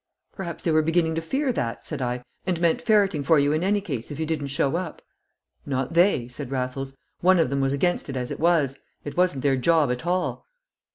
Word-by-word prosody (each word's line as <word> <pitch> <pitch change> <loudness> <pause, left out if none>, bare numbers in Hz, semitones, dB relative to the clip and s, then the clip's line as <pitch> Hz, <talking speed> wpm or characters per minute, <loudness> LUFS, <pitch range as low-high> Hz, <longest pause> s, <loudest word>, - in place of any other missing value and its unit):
"Perhaps 175 -4 -6
they 165 - +1
were 155 0 +4
beginning 165 +1 +1
to 165 - -1
fear 265 - -1
that," 115 - -3
said - - -5
I, 125 0 -2 0.2
"and 180 -3 0
meant 170 -1 +2
ferreting 200 -8 +3
for 155 +3 +4
you 140 0 +3
in 155 +3 0
any 205 +2 +2
case 135 - -5
if 145 - -7
you 160 - 0
didn't 155 -3 -2
show 140 +1 0
up." 175 -2 -4 0.6
"Not 135 +2 -2
they," 170 -8 +3
said 125 +1 -7
Raffles. 135 +1 -3 0.2
"One 185 +1 +5
of 160 -6 +2
them 140 0 0
was 135 0 +1
against 165 +3 0
it 135 - -4
as 125 -1 -3
it - - -5
was; 155 -5 +2 0.3
it 145 - -6
wasn't 180 -7 +1
their 135 -2 +3
job 155 0 +3
at 125 0 -3
all." 180 - -1
155 Hz, 225 wpm, -25 LUFS, 135-175 Hz, 0.6 s, One